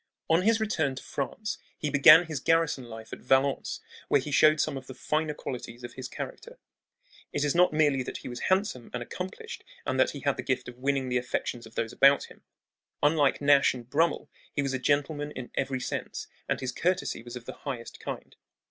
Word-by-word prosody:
On 165 +2 +5
his 225 +3 +3
return 160 -11 0
to 130 - -8
France 210 +9 -4 0.2
he 150 - -2
began 150 +4 +8
his 155 -4 -4
garrison 165 -3 +2
life 110 -1 -9
at - - -7
Valence, 135 +2 +1 0.3
where - - +4
he 145 +3 -5
showed 155 +2 +5
some 155 - +1
of 130 -1 -7
the 130 - -9
finer 155 +3 -1
qualities 120 -3 -7
of 120 - -7
his 130 -1 -6
character. 480 - -8 0.7
It 145 - -1
is 145 - +2
not 180 +1 +5
merely 150 -3 +3
that 125 - -5
he - - -9
was 120 -1 -6
handsome 185 - 0
and 120 - -3
accomplished 190 - -7 0.2
and - - -1
that - - +5
he - - -7
had - - +1
the - - -2
gift - - -1
of 125 0 -10
winning 135 -1 0
the 125 0 +2
affections 120 -1 -3
of 110 - -18
those 115 0 -2
about 140 +1 +6
him. - - -16 0.6
Unlike 145 -2 +3
Nash 140 -2 +5
and 120 -2 -9
Brummel, 155 +4 +1 0.2
he 145 - -1
was 135 -1 -1
a 130 - -1
gentleman 145 +2 0
in 125 -1 -7
every 135 -1 -1
sense, - - -4 0.2
and - - 0
his 130 -1 -2
courtesy 180 -3 -1
was 120 +1 -9
of 120 -1 -8
the - - -6
highest 125 -5 -6
kind. - - -7
140 Hz, 210 wpm, -28 LUFS, 125-155 Hz, 0.7 s, began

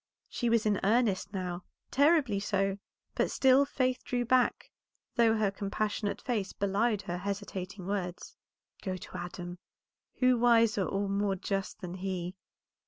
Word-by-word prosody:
She 240 - -1
was 230 -1 +3
in 205 -2 +2
earnest 205 -2 +2
now, 180 -2 -4 0.3
terribly 285 -7 +4
so, 195 -1 0 0.3
but - - +1
still 265 +1 +5
Faith 255 -2 0
drew 245 -1 -1
back, 255 +1 +2 0.4
though 230 -2 +4
her 210 -2 +2
compassionate 205 +1 -2
face 215 -7 -2
belied 205 +2 +1
her 180 -2 -4
hesitating 195 -1 -5
words. 185 -3 -4 0.5
"Go 185 -2 -3
to 185 - -11
Adam; 175 0 -6 0.6
who 255 -1 +3
wiser 230 -4 +4
or 200 +1 -1
more 200 0 0
just 195 +2 -3
than 180 -2 -5
he?" 185 -1 -3
200 Hz, 140 wpm, -31 LUFS, 190-235 Hz, 0.6 s, still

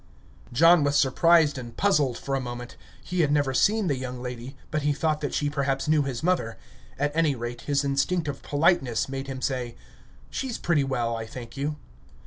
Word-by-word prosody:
John 165 +5 +6
was 145 0 +2
surprised 150 +1 +4
and 120 -2 -9
puzzled 150 -11 +2
for 140 - -5
a 135 - +1
moment. 120 0 -7 0.3
He 180 - -3
had 150 -3 +2
never 145 -2 +2
seen 215 +9 +3
the 145 -6 +1
young 125 -1 -5
lady, 125 +2 -7
but 155 - 0
he 145 0 +1
thought 155 +1 0
that 145 - -2
she 145 - 0
perhaps 140 -1 -1
knew 155 -1 +4
his 135 -1 -3
mother; 175 -10 0 0.4
at 145 +2 -1
any 160 -4 +2
rate, 120 0 -5
his 145 -1 0
instinct 150 +5 0
of 140 -1 -4
politeness 145 -6 +1
made 135 0 -5
him 130 -2 -6
say: 125 -3 -2 0.6
"She's 260 -4 -3
pretty 160 -5 +1
well, 120 -4 -1
I 115 0 -5
thank 120 0 -9
you." 145 +2 -2
140 Hz, 195 wpm, -26 LUFS, 125-155 Hz, 0.6 s, John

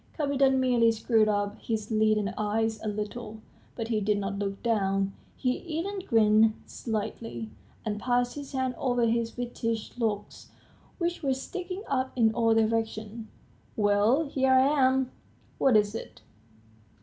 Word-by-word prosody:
Kapiton 275 -3 +2
merely 245 -3 +4
screwed 220 -1 +2
up 205 0 -1
his 220 -1 -3
leaden 215 -1 +2
eyes 220 +1 -1
a - - -4
little, 210 +1 -5 0.4
but 225 -1 -4
he 220 -2 +1
did 210 0 +1
not 200 0 -3
look 195 -1 -4
down; 195 -4 +1 0.2
he 250 -1 0
even 355 +5 -4
grinned 220 - +4
slightly, 210 - -5 0.3
and 210 -1 -2
passed 245 +1 +1
his 285 -1 -8
hand 260 -1 0
over 245 -2 +1
his 230 +1 0
whitish 230 -2 -3
locks 210 -3 -3 0.5
which 345 -1 -2
were 270 -3 +1
sticking 365 +7 -6
up 260 -1 -1
in 225 -3 +3
all 225 -1 +3
directions. 220 0 -1 0.5
"Well, 210 +8 +3
here 265 -1 +1
I 260 0 +6
am. 265 -3 +2 0.5
What 255 -5 +5
is 210 0 +1
it?" - - -8
225 Hz, 145 wpm, -28 LUFS, 215-260 Hz, 0.5 s, I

